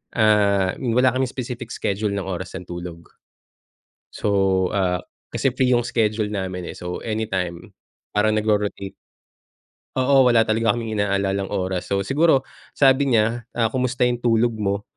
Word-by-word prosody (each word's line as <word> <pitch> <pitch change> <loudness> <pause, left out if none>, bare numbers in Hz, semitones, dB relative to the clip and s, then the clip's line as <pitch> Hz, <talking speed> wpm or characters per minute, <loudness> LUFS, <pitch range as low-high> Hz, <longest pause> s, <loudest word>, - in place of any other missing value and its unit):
ah, 100 -4 +3
ni 125 - -1
wala 125 0 +4
kaming 130 0 0
specific 125 -1 -6
schedule 105 +2 -2
ng 100 -1 -3
oras 95 0 -5
ng 90 - -9
tulog. 85 -1 -8 1.0
So, 95 -2 +1
ah, 90 -3 0 0.2
kasi 135 - 0
free 130 0 +1
yung 120 - 0
schedule 110 -2 0
namin 95 -3 -4
eh, - - -13
so 90 0 -5
anytime, 95 -6 -3 0.4
parang 105 +1 +2
nagro-rotate 105 -2 -1 1.0
oo 130 0 +4
wala 115 -2 +5
talaga 110 -1 +1
kaming 110 -3 -3
inaalalang 100 -1 0
oras 95 -2 -3
so 100 0 0
siguro 135 - +3 0.3
sabi 135 0 +4
niya, 115 +2 +1
"Ah, 115 -2 +1
kumusta 125 0 0
yung 125 -1 +1
tulog 120 0 +2
mo?" 100 -1 -2
105 Hz, 150 wpm, -22 LUFS, 95-120 Hz, 1.0 s, wala